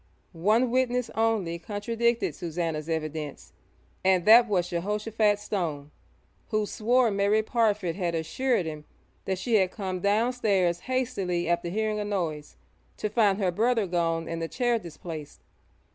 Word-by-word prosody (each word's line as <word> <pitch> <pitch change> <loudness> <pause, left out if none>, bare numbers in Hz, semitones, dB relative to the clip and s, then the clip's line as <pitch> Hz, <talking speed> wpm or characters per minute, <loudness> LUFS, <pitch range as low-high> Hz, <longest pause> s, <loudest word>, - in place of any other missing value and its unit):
One 215 +9 +2
witness 250 -1 +1
only 215 -7 0
contradicted 230 +4 -1
Susannah's 165 -2 -3
evidence, 155 -2 -4 0.5
and 185 -2 +3
that 235 +2 +8
was 180 -4 0
Jehoshaphat 210 +4 0
Stone, 160 -9 -3 0.6
who 215 -2 0
swore 235 +3 +2
Mary 200 +2 +2
Parfitt 210 -7 +1
had 175 -4 -1
assured 180 +6 0
him 155 -1 -6 0.4
that 190 -1 -1
she 225 +4 +2
had 190 -2 +2
come 190 -2 -4
downstairs 200 -4 +1
hastily 200 -9 -1
after 170 0 0
hearing 215 +2 -1
a - - -1
noise, 170 -8 -3 0.4
to 215 - -2
find 210 -3 +3
her 190 -4 +1
brother 225 +3 +1
gone 165 -2 -1
and 165 0 -4
the 165 - -2
chair 240 +4 0
displaced. 160 -4 -9
200 Hz, 140 wpm, -27 LUFS, 170-225 Hz, 0.6 s, that